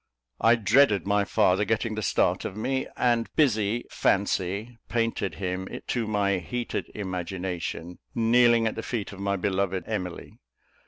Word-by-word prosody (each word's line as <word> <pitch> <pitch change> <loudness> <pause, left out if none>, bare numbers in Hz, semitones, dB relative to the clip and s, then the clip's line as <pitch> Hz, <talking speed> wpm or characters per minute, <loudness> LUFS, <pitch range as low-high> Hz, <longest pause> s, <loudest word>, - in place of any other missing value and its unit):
I 115 +1 +5
dreaded 110 -1 +4
my 100 0 +2
father 95 +1 +3
getting 110 +1 0
the 110 - -3
start - - +1
of 95 - -5
me; 130 +4 -1
and 120 -2 +2
busy 115 -6 +2
fancy 100 +4 0
painted 115 -7 -1
him, 95 +1 -3 0.2
to 115 -3 0
my 100 -2 +1
heated 120 +8 -4
imagination, 90 -2 -4 0.2
kneeling 120 0 +4
at 110 - 0
the - - -5
feet 115 -5 -4
of 100 - -10
my 100 0 0
beloved 95 -1 -1
Emily. 90 -5 -5
105 Hz, 145 wpm, -26 LUFS, 95-115 Hz, 0.2 s, I